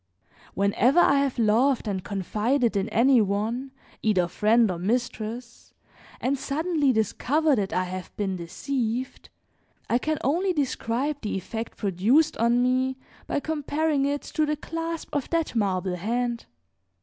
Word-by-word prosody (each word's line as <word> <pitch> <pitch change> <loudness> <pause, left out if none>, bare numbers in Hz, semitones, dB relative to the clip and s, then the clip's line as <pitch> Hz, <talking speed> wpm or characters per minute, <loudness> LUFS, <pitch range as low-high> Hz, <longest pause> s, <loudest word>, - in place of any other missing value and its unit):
Whenever 205 - +3
I 280 -5 +5
have 275 -2 0
loved 235 +3 +2
and 190 -3 -2
confided 215 +6 0
in 200 +2 0
any 240 +3 +4
one, 215 +6 -1 0.3
either 190 -5 +2
friend 220 +3 +3
or 170 - -4
mistress, 235 +3 -3 0.4
and 270 +2 0
suddenly 305 -1 +1
discover 275 +7 +1
that 200 -4 -1
I 185 - +1
have 185 0 -6
been 195 -2 -1
deceived, 235 +8 -3 0.6
I 240 - +2
can 310 +3 -1
only 355 +7 +1
describe 275 -1 -1
the 210 -3 -2
effect 225 +4 -6
produced 225 - +2
on 235 +2 +3
me 255 +1 +1 0.3
by 285 - -1
comparing 300 -1 0
it 285 0 -2
to 310 - -1
the 300 0 -1
clasp 330 +2 -5
of 285 -2 -2
that 330 -6 -1
marble 190 -4 0
hand. 235 +5 -2
240 Hz, 140 wpm, -26 LUFS, 210-280 Hz, 0.6 s, I